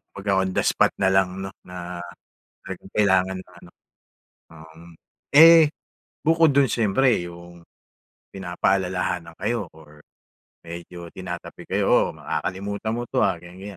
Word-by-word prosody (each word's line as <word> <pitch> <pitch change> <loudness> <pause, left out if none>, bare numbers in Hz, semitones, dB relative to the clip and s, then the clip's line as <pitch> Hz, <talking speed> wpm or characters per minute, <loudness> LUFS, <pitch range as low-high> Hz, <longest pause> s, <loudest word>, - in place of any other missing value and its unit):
Pagka 100 0 -2
on 95 - -3
the - - +1
spot - - +2
na 95 - +3
lang 95 0 +1
'no 95 - -5
na, 90 -1 -7 0.7
talagang 95 0 -8
kailangan 95 -2 +2
na 90 - -14
ano. 85 - -15 0.8
Um, 80 0 -15 0.5
eh 160 0 +8 0.5
bukod 160 -2 +4
do'n 135 -4 +4
siyempre 115 +3 +2
yung, 85 0 -13 0.7
pinapaalalahanan 90 -2 -1
kayo 100 -2 -2
or, 75 -1 -17 0.6
medyo 85 +1 -9
tinatapik 90 0 -8
kayo - - +1
"O, - - +5 0.2
makakalimutan 100 +4 -4
mo 120 - -3
'to - - 0
ah," 95 -3 +1
ganiyan, 95 +3 -11
95 Hz, 130 wpm, -23 LUFS, 90-100 Hz, 0.8 s, eh